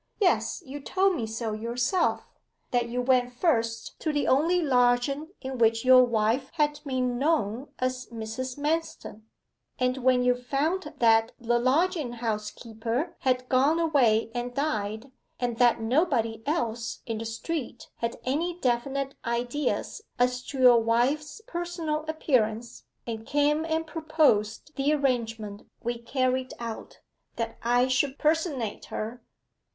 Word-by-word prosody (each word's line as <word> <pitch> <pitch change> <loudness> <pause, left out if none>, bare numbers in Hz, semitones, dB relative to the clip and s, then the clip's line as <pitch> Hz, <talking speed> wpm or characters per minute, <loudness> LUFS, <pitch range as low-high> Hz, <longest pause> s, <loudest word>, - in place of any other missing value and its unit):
'Yes, 370 -2 +1
you 280 +2 -7
told 380 +6 +1
me 230 -8 -3
so 225 0 -3
yourself 245 - 0 0.5
that 240 -1 +1
you 250 +1 -1
went 250 -1 +3
first 235 -5 -1
to 315 - -1
the 290 -1 0
only 325 +7 +3
lodging 260 0 +2
in 265 -2 -5
which 225 +1 +3
your 255 0 +8
wife 235 +2 +1
had 295 -2 +1
been 255 -3 -1
known 275 -4 0
as 255 0 -2
Mrs. 235 +3 -5
Manston, 295 -7 -3 0.5
and 255 +1 +1
when 255 -1 +3
you 250 0 +4
found 295 +6 -2
that 225 -2 +4
the 240 0 +1
lodging 295 +1 +1
house 220 -3 -2
keeper 230 +6 -4
had 255 -1 0
gone 275 +6 +3
away 245 -9 +3
and 245 0 -4
died, 220 -4 -2 0.3
and 240 -2 -1
that 240 -2 +5
nobody 230 -2 +1
else 235 -7 -2
in 225 -3 -3
the 225 - -5
street 240 +4 -4
had 230 0 -3
any 330 +7 -1
definite 270 +1 -1
ideas 245 - -2 0.2
as 250 0 +1
to 280 - -6
your 250 -2 +7
wife's 265 - 0
personal 340 -6 -3
appearance, 240 -7 0 0.2
and 225 -1 -6
came 295 +2 +2
and 325 0 -1
proposed 305 -6 +1
the 275 +2 +2
arrangement 230 -7 -1 0.2
we 240 0 -2
carried 255 +1 -1
out 230 -2 -7 0.3
that 230 -1 -4
I 245 +2 +3
should 265 +2 +1
personate 300 - 0
her. 230 +3 -5
255 Hz, 140 wpm, -27 LUFS, 235-295 Hz, 0.5 s, your